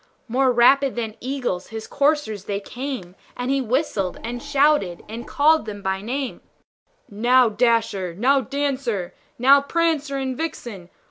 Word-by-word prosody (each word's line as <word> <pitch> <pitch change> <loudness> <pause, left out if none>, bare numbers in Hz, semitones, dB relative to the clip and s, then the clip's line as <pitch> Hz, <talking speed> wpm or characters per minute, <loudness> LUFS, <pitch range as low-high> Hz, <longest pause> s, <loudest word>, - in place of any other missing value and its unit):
More 255 +2 +2
rapid 265 +3 +4
than 225 -3 -4
eagles 250 -8 -3
his 220 -1 -7
coursers 280 -9 0
they 200 -1 -2
came, 245 -4 -6 0.2
And 245 +2 -2
he 275 0 +1
whistled, 235 - -1
and 240 +1 -5
shouted, 285 - +2
and 230 +2 -7
called 305 -3 +3
them 205 -1 -7
by 190 0 -1
name; 260 +5 -4 0.7
"Now, 240 +4 +3
Dasher! 215 -5 +1
now, 265 +7 +3
Dancer! 260 -10 -2 0.2
now, 275 +3 +6
Prancer 305 -2 0
and 265 -1 -2
Vixen! 240 - -6
245 Hz, 140 wpm, -22 LUFS, 210-280 Hz, 0.7 s, now